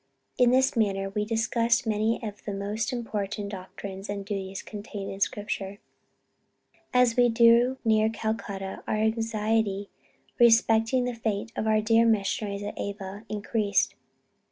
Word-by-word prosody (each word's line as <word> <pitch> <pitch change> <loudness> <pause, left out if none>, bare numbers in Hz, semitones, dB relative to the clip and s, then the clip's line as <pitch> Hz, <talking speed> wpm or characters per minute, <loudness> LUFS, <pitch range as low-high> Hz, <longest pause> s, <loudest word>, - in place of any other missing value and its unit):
In 250 -1 +6
this 260 +1 +3
manner 195 -3 0
we 210 +1 -1
discussed 230 +2 +1
many 220 +1 +1
of 210 -2 -7
the 205 - -3
most 210 +5 -2
important 210 -4 -3
doctrines 195 0 -8
and 200 -1 -4
duties 195 -2 -4
contained 205 -1 -7
in 195 - -7
Scripture. 200 -1 -2 1.1
As 250 -2 +4
we 245 -1 +5
drew 235 +2 +5
near 220 -1 +4
Calcutta, 210 -4 -4
our - - 0
anxiety 220 -2 0 0.5
respecting 225 +1 +4
the 250 - -2
fate 225 -1 -3
of 220 - -2
our 215 0 +3
dear 225 +1 +4
missionaries 205 -1 0
at 205 - -6
Ava, 200 +1 -6
increased. 205 -1 0
215 Hz, 135 wpm, -27 LUFS, 200-230 Hz, 1.1 s, In